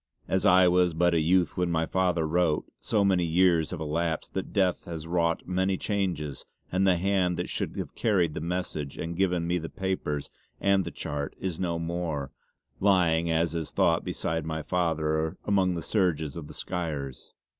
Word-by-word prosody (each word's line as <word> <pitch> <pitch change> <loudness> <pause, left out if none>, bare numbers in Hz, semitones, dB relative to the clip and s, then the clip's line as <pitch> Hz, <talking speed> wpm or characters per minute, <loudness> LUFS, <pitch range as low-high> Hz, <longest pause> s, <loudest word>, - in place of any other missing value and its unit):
As 95 - +2
I 90 0 +7
was 90 -1 +3
but 85 +1 +3
a 85 - +3
youth 90 +1 +2
when 90 -1 +1
my 80 -1 +1
father 90 -3 +1
wrote, 80 -1 +1
so 105 -3 +1
many 95 -3 +3
years 85 -1 +3
have 90 - -5
elapsed 80 +1 -2
that 95 - -3
death 95 -3 +1
has 80 -2 -6
wrought 85 0 0
many 95 +1 +1
changes 90 - -2 0.3
and 95 +1 +2
the 95 - +5
hand 90 -1 +1
that - - -3
should - - -3
have - - -4
carried 90 -8 +1
the 75 - -4
message 85 -4 -3
and 85 +1 -4
given 90 -2 +1
me 90 +1 0
the 80 - -6
papers 95 -7 -3 0.3
and 100 -1 +3
the - - -3
chart 70 -1 -4
is 90 -4 -3
no 85 -2 -1
more, 85 -4 -3 0.5
lying 85 -4 +3
as 80 0 +1
is 80 -2 -3
thought - - +2
beside 80 0 -2
my 80 0 -3
father 80 -3 0
amongst 95 -3 +2
the 85 - -4
surges 80 -8 0
of 80 -3 -7
the - - -10
Skyres. 75 -7 -5
85 Hz, 185 wpm, -28 LUFS, 80-95 Hz, 0.5 s, I